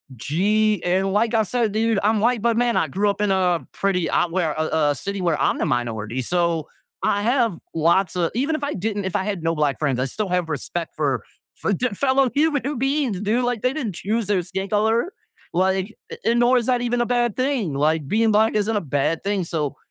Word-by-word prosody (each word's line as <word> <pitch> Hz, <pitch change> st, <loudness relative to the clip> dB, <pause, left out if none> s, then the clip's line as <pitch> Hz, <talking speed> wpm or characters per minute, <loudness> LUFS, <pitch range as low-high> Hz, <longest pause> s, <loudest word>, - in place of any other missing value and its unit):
Gee, 205 Hz, -, +1 dB
and 190 Hz, +2 st, +1 dB
like 220 Hz, +3 st, +1 dB
I 220 Hz, -, +4 dB
said, 230 Hz, +1 st, 0 dB
dude, 220 Hz, -1 st, +1 dB
I'm 215 Hz, +1 st, +3 dB
white, 235 Hz, 0 st, +2 dB
but, 230 Hz, 0 st, +1 dB
man, 240 Hz, 0 st, +2 dB
I 160 Hz, -, +2 dB
grew 200 Hz, +8 st, +1 dB
up 200 Hz, 0 st, -2 dB
in 205 Hz, -1 st, +2 dB
a 180 Hz, -3 st, +1 dB
pretty 185 Hz, -4 st, 0 dB
uh, 175 Hz, -, +1 dB
where 165 Hz, -3 st, 0 dB
a 155 Hz, +1 st, -1 dB, 0.3 s
a -, -, -2 dB
city 200 Hz, +9 st, -4 dB
where 170 Hz, -4 st, +1 dB
I'm -, -, +2 dB
the -, -, +1 dB
minority. 120 Hz, 0 st, -2 dB
So, 170 Hz, +2 st, 0 dB, 0.4 s
I 200 Hz, -, +1 dB
have 235 Hz, -5 st, +1 dB, 0.2 s
lots 170 Hz, +3 st, +2 dB
a 170 Hz, -2 st, +1 dB
even 280 Hz, +6 st, 0 dB
if 310 Hz, -, -5 dB
I 285 Hz, +1 st, -1 dB
didn't 205 Hz, +1 st, -2 dB
if 190 Hz, -, -3 dB
I -, -, +1 dB
had 200 Hz, -4 st, -3 dB
no 165 Hz, 0 st, 0 dB
black 150 Hz, -3 st, 0 dB
friends, 140 Hz, -5 st, 0 dB
I 130 Hz, -, +1 dB
still 200 Hz, +9 st, -3 dB
have 180 Hz, -2 st, 0 dB
respect 160 Hz, +3 st, -4 dB
for 140 Hz, -7 st, 0 dB, 0.3 s
for -, -, -1 dB
the 250 Hz, +6 st, 0 dB
fellow 265 Hz, +2 st, +2 dB
human 290 Hz, -2 st, +1 dB
beings, 270 Hz, -6 st, 0 dB
dude! 220 Hz, +4 st, +1 dB
Like, 245 Hz, -3 st, -1 dB
they 255 Hz, +1 st, +2 dB
didn't 235 Hz, -, -3 dB
choose 215 Hz, +4 st, -2 dB
their 200 Hz, -3 st, +2 dB
skin 190 Hz, +3 st, -4 dB
color. 225 Hz, -, +1 dB, 0.4 s
Like 190 Hz, +3 st, 0 dB, 0.2 s
a -, -, -6 dB
and 235 Hz, -, +2 dB
nor 245 Hz, +1 st, +4 dB
is 235 Hz, -, -4 dB
that 250 Hz, -1 st, +2 dB
even 245 Hz, 0 st, 0 dB
a -, -, +1 dB
bad 240 Hz, -3 st, +1 dB
thing. 255 Hz, -, 0 dB
Like, 150 Hz, +1 st, +1 dB
being 220 Hz, +6 st, +2 dB
black 220 Hz, +2 st, +3 dB
isn't 215 Hz, +1 st, +1 dB
a 205 Hz, -, +1 dB
bad 145 Hz, +2 st, -1 dB
thing. 200 Hz, -1 st, 0 dB
So, 155 Hz, -4 st, -2 dB
200 Hz, 230 wpm, -22 LUFS, 170-235 Hz, 0.4 s, I